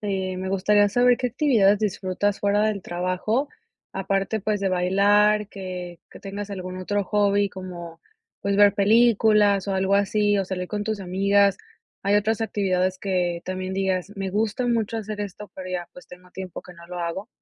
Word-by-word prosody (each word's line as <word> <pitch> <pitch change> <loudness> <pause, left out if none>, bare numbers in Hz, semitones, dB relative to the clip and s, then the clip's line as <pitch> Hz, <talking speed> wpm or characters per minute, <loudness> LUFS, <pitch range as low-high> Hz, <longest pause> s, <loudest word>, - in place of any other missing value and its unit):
eh, 190 -3 -2
me 190 0 -4
gustaría 205 +2 +3
saber, 245 +3 +3
¿qué 250 - 0
actividades 225 -6 +3
disfrutas 205 -1 -1
fuera 205 +1 +2
del 215 -2 0
trabajo?, 185 +10 -1 0.4
aparte, 195 +2 -1
pues, 210 0 -1
de 195 -1 0
bailar, 205 +3 +3
que 180 -3 -7
que - - -13
tengas 200 +1 -6
algún 185 -2 -6
otro 205 +2 -1
hobby 205 0 +2
como, 175 -3 -9 0.4
pues, 200 0 0
ver 205 -1 +6
películas, 210 -2 +4
o 195 - 0
algo 190 +1 +1
así, 205 +1 +2
o 195 - -1
salir 180 -1 -4
con 205 -1 -3
tus 215 -2 -2
amigas. 195 +1 +2 0.4
Hay 200 +1 +2
otras 215 +2 +1
actividades 185 -3 0
que 180 -3 -1
también 185 0 -4
digas: 190 -1 -1
"Me 195 -1 -3
gusta 215 +4 -1
mucho 230 -2 0
hacer 215 -1 -5
esto", 205 +1 -7
pero, 185 -1 -7
ya, 175 -1 -3
pues, 180 - -14
tengo 180 0 -15
tiempo 185 -1 -7
que 180 - -13
no 170 -1 -15
lo 180 0 -7
hago. 175 +5 -4
195 Hz, 180 wpm, -24 LUFS, 185-210 Hz, 0.4 s, ver